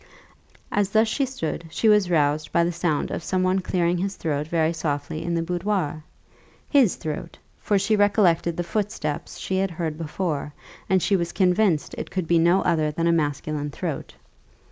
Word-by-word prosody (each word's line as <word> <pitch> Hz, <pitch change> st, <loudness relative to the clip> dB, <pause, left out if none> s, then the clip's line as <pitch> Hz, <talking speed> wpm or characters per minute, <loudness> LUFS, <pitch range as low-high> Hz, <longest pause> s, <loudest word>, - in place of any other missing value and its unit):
As 205 Hz, -2 st, +1 dB
thus 220 Hz, +2 st, +3 dB
she 270 Hz, +5 st, 0 dB
stood 170 Hz, -10 st, -4 dB
she 190 Hz, +7 st, 0 dB
was 210 Hz, -4 st, +5 dB
roused 150 Hz, -2 st, +1 dB
by 170 Hz, -, +3 dB
the 170 Hz, -, 0 dB
sound 165 Hz, -3 st, -1 dB
of -, -, -3 dB
some 185 Hz, +1 st, 0 dB
one 185 Hz, +1 st, +2 dB
clearing 175 Hz, -1 st, 0 dB
his 195 Hz, +1 st, -2 dB
throat 150 Hz, -2 st, -2 dB
very 165 Hz, 0 st, +1 dB
softly 155 Hz, -1 st, -3 dB
in 170 Hz, 0 st, -1 dB
the 165 Hz, -, 0 dB
boudoir 175 Hz, -3 st, -2 dB, 0.6 s
his 270 Hz, -, +4 dB
throat; 155 Hz, +1 st, -6 dB, 0.2 s
for 205 Hz, -, +1 dB
she 215 Hz, +3 st, +2 dB
recollected 195 Hz, -5 st, +3 dB
the 175 Hz, -, 0 dB
footsteps 170 Hz, -5 st, -3 dB
she 190 Hz, -, -2 dB
had 195 Hz, +1 st, +1 dB
heard 160 Hz, -2 st, -4 dB
before, 150 Hz, -2 st, -3 dB, 0.3 s
and 190 Hz, -2 st, +3 dB
she 200 Hz, -, +3 dB
was 170 Hz, -2 st, -1 dB
convinced 180 Hz, -4 st, +2 dB
it -, -, -5 dB
could 185 Hz, -3 st, -3 dB
be 170 Hz, 0 st, +4 dB
no 175 Hz, +4 st, +4 dB
other 155 Hz, -3 st, +2 dB
than 165 Hz, +2 st, -2 dB
a 170 Hz, -, +4 dB
masculine 150 Hz, -1 st, -1 dB
throat. -, -, -5 dB
170 Hz, 185 wpm, -24 LUFS, 155-190 Hz, 0.6 s, was